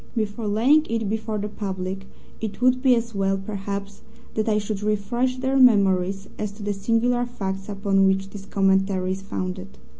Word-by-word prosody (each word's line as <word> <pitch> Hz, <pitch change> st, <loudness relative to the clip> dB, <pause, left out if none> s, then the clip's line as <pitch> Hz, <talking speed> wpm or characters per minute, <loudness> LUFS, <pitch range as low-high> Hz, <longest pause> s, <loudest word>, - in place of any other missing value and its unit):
Before 215 Hz, 0 st, -2 dB
laying 260 Hz, +10 st, +4 dB
it 225 Hz, -2 st, -1 dB
before 220 Hz, 0 st, -2 dB
the 210 Hz, 0 st, -2 dB
public 190 Hz, -2 st, -5 dB, 0.3 s
it 220 Hz, -2 st, -5 dB
would 255 Hz, +1 st, +3 dB
be 260 Hz, -2 st, +5 dB
as 230 Hz, 0 st, -2 dB
well, 195 Hz, -1 st, +1 dB
perhaps, 200 Hz, 0 st, -5 dB, 0.3 s
that 220 Hz, 0 st, 0 dB
I 210 Hz, -, +3 dB
should 210 Hz, -1 st, -3 dB
refresh 235 Hz, +5 st, 0 dB
their 265 Hz, +1 st, 0 dB
memories 195 Hz, -6 st, +4 dB
as 210 Hz, -1 st, -2 dB
to 205 Hz, 0 st, -10 dB
the 205 Hz, 0 st, -1 dB
singular 230 Hz, +4 st, +1 dB
facts 195 Hz, -4 st, -5 dB
upon 195 Hz, -1 st, +2 dB
which 195 Hz, 0 st, 0 dB
this 200 Hz, -1 st, -9 dB
commentary 190 Hz, -1 st, +1 dB
is 190 Hz, +1 st, -3 dB
founded. 185 Hz, 0 st, -5 dB
205 Hz, 175 wpm, -24 LUFS, 195-225 Hz, 0.3 s, be